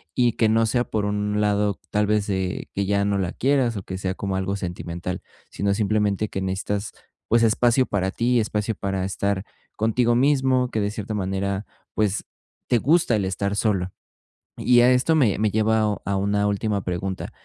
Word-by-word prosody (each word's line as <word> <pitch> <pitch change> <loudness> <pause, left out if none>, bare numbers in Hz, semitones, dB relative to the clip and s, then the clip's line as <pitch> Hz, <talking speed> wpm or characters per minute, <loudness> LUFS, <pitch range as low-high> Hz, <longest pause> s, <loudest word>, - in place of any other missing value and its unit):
y 120 -2 +3
que 110 - +2
no 115 +1 +3
sea 120 +2 +1
por 105 - -2
un 105 0 -1
lado, 105 -1 +1
tal 105 0 +1
vez, 105 -1 +1
de 95 -2 -2
que 100 0 0
ya 100 0 +1
no 100 -1 +1
la 90 -3 -2
quieras, 130 -3 +1
o 95 - -5
que 95 - -6
sea 95 0 -2
como 95 -1 -3
algo 95 +1 -1
sentimental, 90 -1 -5 0.3
sino 100 0 0
simplemente 105 0 0
que 95 - -4
necesitas, 100 +2 -2 0.4
pues, 115 0 +3
espacio 120 +3 +3
para 95 -2 -1
ti, 120 +2 +1
espacio 105 0 -1
para 95 -1 -2
estar 100 0 -1 0.3
contigo 115 +2 +2
mismo, 130 -1 +2
que 110 - -2
de 100 0 -1
cierta 105 0 -5
manera, 95 +1 -2 0.3
pues, 105 -2 0 0.4
te 120 - +3
gusta 155 -4 +3
el 100 - -1
estar 100 +2 -2
solo. 95 -4 0 0.7
Y 120 -1 +5
a 125 +1 +6
esto 125 +6 +3
me 125 -11 +3
me 110 -1 +2
lleva 110 +1 +2 0.2
a 100 - 0
una 100 +1 +1
última 100 -1 -1
pregunta, 95 +1 -4
105 Hz, 185 wpm, -23 LUFS, 95-115 Hz, 0.7 s, a